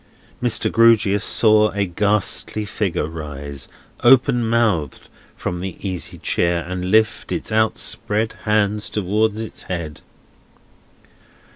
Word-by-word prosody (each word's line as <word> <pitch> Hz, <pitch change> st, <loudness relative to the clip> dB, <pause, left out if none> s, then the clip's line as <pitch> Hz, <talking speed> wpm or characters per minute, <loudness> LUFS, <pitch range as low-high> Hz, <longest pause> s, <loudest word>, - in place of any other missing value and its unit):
Mr. -, -, +1 dB
Grewgious 110 Hz, -3 st, +4 dB
saw 110 Hz, -1 st, +4 dB
a 100 Hz, 0 st, 0 dB
ghastly 105 Hz, +2 st, 0 dB
figure 95 Hz, -6 st, -2 dB
rise, 75 Hz, -3 st, -7 dB, 0.4 s
open 120 Hz, -1 st, +5 dB
mouthed, 110 Hz, -, 0 dB, 0.3 s
from 90 Hz, -, -4 dB
the 95 Hz, -1 st, -5 dB
easy 90 Hz, -2 st, -4 dB
chair, 85 Hz, -1 st, 0 dB
and 90 Hz, 0 st, -4 dB
lift 110 Hz, +3 st, +1 dB
its -, -, -4 dB
outspread 110 Hz, 0 st, 0 dB
hands 105 Hz, -1 st, +1 dB
towards 105 Hz, +2 st, 0 dB
its 110 Hz, -1 st, -7 dB
head. 85 Hz, -4 st, -5 dB
105 Hz, 110 wpm, -20 LUFS, 90-110 Hz, 0.4 s, open